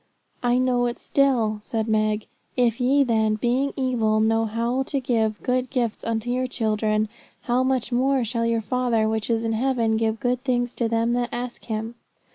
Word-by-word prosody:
'I 245 0 +2
know 250 -1 +2
it 240 - -4
still,' 240 -6 +1
said 220 +1 -2
Meg. 215 -1 +1 0.3
'"If 240 -1 +2
ye 275 +3 +4
then, 220 -3 +2
being 250 +5 0
evil, 235 -5 +1
know 225 +1 +2
how 235 +4 -1
to 275 +1 -2
give 225 -5 0
good 255 0 0
gifts 240 -4 -2
unto 230 +1 -2
your 255 +1 0
children: 215 -2 0 0.3
how 245 +1 +1
much 260 -2 0
more 260 +1 +2
shall 230 0 -1
your 230 -1 +1
Father 235 -2 +1
which 220 0 -2
is 230 -1 +1
in 225 0 0
heaven 230 -2 +1
give 220 0 0
good 250 0 -1
things 245 -2 0
to 230 -2 -1
them 230 +1 +1
that 240 0 0
ask 245 0 -5
Him?"' 220 0 -3
235 Hz, 185 wpm, -24 LUFS, 220-250 Hz, 0.3 s, ye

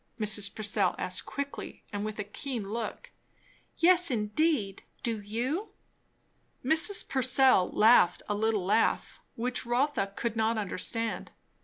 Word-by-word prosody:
Mrs. 210 -1 +1
Purcell 215 -1 +1
asked - - -1
quickly 280 0 -6
and 205 0 -3
with 215 0 -5
a 210 - -3
keen 220 +1 -5
look. 225 -1 -5 0.7
"Yes, 355 0 +5
indeed. 215 - 0 0.2
Do 225 -3 -2
you?" 245 - -3 0.9
Mrs. 325 +8 +3
Purcell 260 -6 +3
laughed 220 -4 +4
a 210 - -1
little 210 -2 0
laugh, 205 +4 0
which 245 +2 -2
Rotha 245 -4 0
could 235 -1 -3
not 225 0 0
understand. 220 +2 -3
225 Hz, 125 wpm, -29 LUFS, 210-265 Hz, 0.9 s, Yes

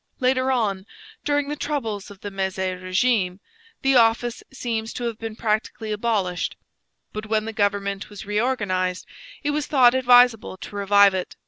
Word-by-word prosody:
Later 255 0 +2
on, 205 -6 -1 0.4
during 290 -1 0
the 295 - -3
troubles 230 -10 -3
of 200 -2 -14
the 205 - -6
Mezy 190 -1 -2
regime, 185 +1 0 0.4
the 270 0 +3
office 230 +1 +2
seems 230 -4 -3
to 245 - -5
have 230 -2 -3
been 225 -1 -6
practically 215 0 -2
abolished; 210 -5 -1 0.6
but 215 0 -5
when 215 0 0
the 225 - -5
government 200 -1 -1
was 205 -1 -9
reorganized, 205 -5 -1 0.4
it 290 - 0
was 295 0 -2
thought 255 -5 +5
advisable 245 -5 +4
to 205 - -10
revive 200 0 +5
it. 185 -1 -4
215 Hz, 155 wpm, -23 LUFS, 200-245 Hz, 0.6 s, thought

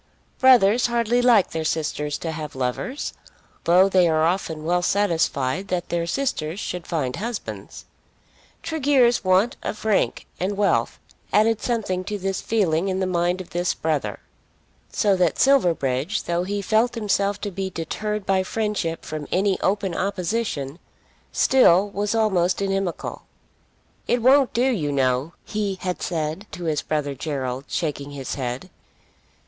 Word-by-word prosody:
Brothers 240 -3 +5
hardly 235 0 +1
like 235 -6 +4
their 160 -1 -2
sisters 150 -2 -2
to 165 - -4
have 155 -3 -6
lovers, 130 - -3 0.5
though 180 +3 +6
they 185 -3 +4
are 155 0 +2
often 165 -3 -1
well 175 +2 +2
satisfied 175 -4 0
that 180 -1 -2
their 170 -1 -1
sisters 175 - -2
should 180 -5 -5
find 140 -7 -2
husbands. 230 +1 -6 0.8
Tregear's 275 -7 +2
want 185 +5 +3
of 215 - -5
rank 215 -3 +1
and 195 +2 -1
wealth 205 -1 +1 0.3
added 220 +1 +3
something 205 -6 -1
to 210 - -3
this 195 -1 -2
feeling 190 -5 +1
in 190 -1 -1
the 190 - +1
mind 175 0 0
of 175 - -12
this 175 +2 0
brother; 145 -11 -2 0.7
so 200 -2 +2
that 175 -3 +2
Silverbridge, 170 - +2
though 175 +1 -1
he 200 +1 -3
felt 225 +5 +2
himself 205 -2 0
to 205 - -3
be 190 +1 -3
deterred 210 +4 -4
by 190 -1 +2
friendship 200 -5 -2
from 155 -1 -5
any 190 +1 +1
open 195 -2 0
opposition, 180 -6 -2 0.5
still 205 -6 +4
was 205 +2 -1
almost 190 -5 +2
inimical. 195 -2 -3 0.8
"It 240 -1 +1
won't 270 +1 +5
do, 240 +3 +1
you 185 - 0
know," 135 +3 0
he 205 -2 -2
had 180 -1 -3
said 160 +4 -3
to 175 - -6
his 155 -3 0
brother 150 -2 -2
Gerald, 135 -2 -4
shaking 145 -4 -3
his 140 -2 -5
head. 130 +6 -4
185 Hz, 145 wpm, -23 LUFS, 160-210 Hz, 0.8 s, though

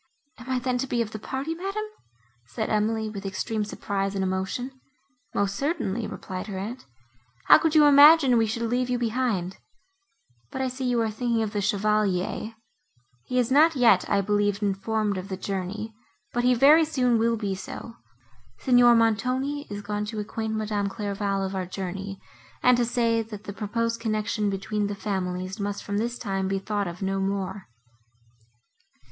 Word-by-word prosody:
"Am 245 +2 -10
I 260 - +1
then 250 0 -1
to 270 - -2
be 240 -2 +1
of 215 - -9
the 215 - -6
party, 270 +8 -3
madam?" 390 +5 -3 0.6
said 220 - -3
Emily, 220 +1 +1
with 205 -2 -6
extreme 205 +3 -2
surprise 200 -1 -3
and 195 - 0
emotion. 190 +7 -2 0.6
"Most 200 -1 0
certainly," 235 - -1
replied 185 +2 -6
her 200 -3 -5
aunt, 220 - -6 0.6
"how - - +8
could 320 0 0
you 305 -1 +7
imagine 290 -2 +8
we 225 - +2
should 230 +2 -3
leave 245 +2 0
you 250 - +1
behind? 225 -6 -1 0.9
But - - -6
I 260 - 0
see 255 +1 -5
you 240 -1 +1
are 220 -1 0
thinking 230 +1 0
of 215 -1 -4
the 205 - 0
Chevalier; 210 +1 0 0.7
he 255 - -2
is 250 0 +1
not 310 +4 +5
yet, 230 -8 +4
I 200 - +3
believe, 205 0 0
informed 205 0 0
of 185 - -7
the 190 - -4
journey, 200 +3 -4 0.4
but 240 - 0
he 250 0 +4
very 295 +6 +7
soon 250 -7 +1
will 230 +1 +2
be 205 -3 -2
so. 195 +4 -7 0.6
Signor 245 -2 +5
Montoni 255 +6 +1
is 205 0 -6
gone 210 0 -2
to 215 0 -5
acquaint 220 +1 -3
Madame 210 -2 -1
Clairval 200 -1 -2
of 190 - -4
our 185 -2 -3
journey, 195 +1 -5 0.4
and 250 0 +6
to 240 0 +1
say, 230 -1 +1
that 210 -2 -8
the 200 - -7
proposed 230 +3 -2
connection 215 -1 -1
between 200 +1 -2
the 205 - -4
families 185 -1 -3
must 200 0 -3
from 200 0 -2
this 235 +2 -2
time 195 -4 -2
be 195 0 0
thought 205 0 -2
of 175 +3 -6
no 195 0 -1
more." 195 0 -3
215 Hz, 175 wpm, -26 LUFS, 195-245 Hz, 0.9 s, how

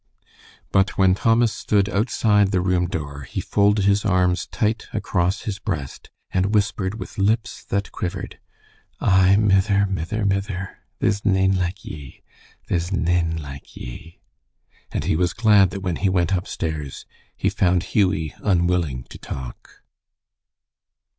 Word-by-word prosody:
But 95 -1 +2
when 95 -1 +5
Thomas 115 +3 +3
stood 100 -2 +1
outside 105 -1 +2
the 95 -2 +1
room 90 -1 +1
door, 70 -4 -5
he 65 - -6
folded 105 0 +2
his 100 +1 +3
arms 90 -2 +1
tight 110 +1 -1
across 95 -3 0
his 105 -2 -4
breast 70 -9 -5 0.2
and 95 +3 +1
whispered 100 -1 0
with - - -8
lips 110 +4 0
that 100 0 -2
quivered, 90 +1 -5 0.6
"Ay, 95 0 +4
mither, 100 -1 +3
mither, 95 +3 -2
mither, 100 -1 -2 0.2
there's 100 0 0
nane 95 -1 +3
like 90 +1 -2
ye. 70 -4 -10 0.4
There's 85 +1 -1
nane 85 -3 +1
like 70 -2 -10
ye." 75 +7 -9 0.7
And - - -2
he - - +1
was 90 +2 +1
glad 105 -3 +5
that 95 - -6
when 90 -3 -2
he 100 - +1
went 90 -1 +1
upstairs, 80 -6 -3 0.3
he - - +1
found 90 -1 +2
Hughie 95 -7 +1
unwilling 85 -9 +1
to - - -10
talk. 65 -3 -9
95 Hz, 140 wpm, -22 LUFS, 85-100 Hz, 0.7 s, when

